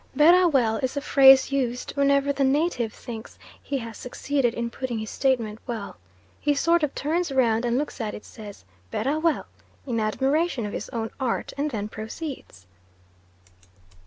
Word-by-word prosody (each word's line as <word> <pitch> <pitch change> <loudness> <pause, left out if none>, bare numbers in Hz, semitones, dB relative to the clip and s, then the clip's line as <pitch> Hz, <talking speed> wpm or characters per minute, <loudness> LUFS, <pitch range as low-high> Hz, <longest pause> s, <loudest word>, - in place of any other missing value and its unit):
"Berrah 350 +5 +6
well" 240 -8 +2
is 260 +4 -2
a - - 0
phrase 270 -1 +6
used 250 -3 -1
whenever 280 0 +2
the 275 - 0
native 270 -4 +1
thinks 225 0 -9 0.2
he 280 - -3
has 230 -3 -7
succeeded 250 -1 -1
in 235 0 -3
putting 255 -2 -4
his 220 -1 -5
statement 235 -5 0
well. 225 -4 -5 0.4
He 290 0 +1
sort 335 +4 +3
of 300 -2 -1
turns 325 +2 -1
round 240 -3 +2
and 240 +1 +1
looks 290 -2 -3
at 215 -2 -3
it, - - -10
says 205 - -11 0.2
"Berrah 275 - -1
well," 325 -1 +1 0.4
in 240 -4 -1
admiration 265 +5 0
of 205 - -5
his - - -5
own 225 -3 -4
art, 255 -3 -2
and 290 +2 -1
then 210 -6 -3
proceeds. 220 - -8
260 Hz, 165 wpm, -25 LUFS, 225-285 Hz, 0.4 s, Berrah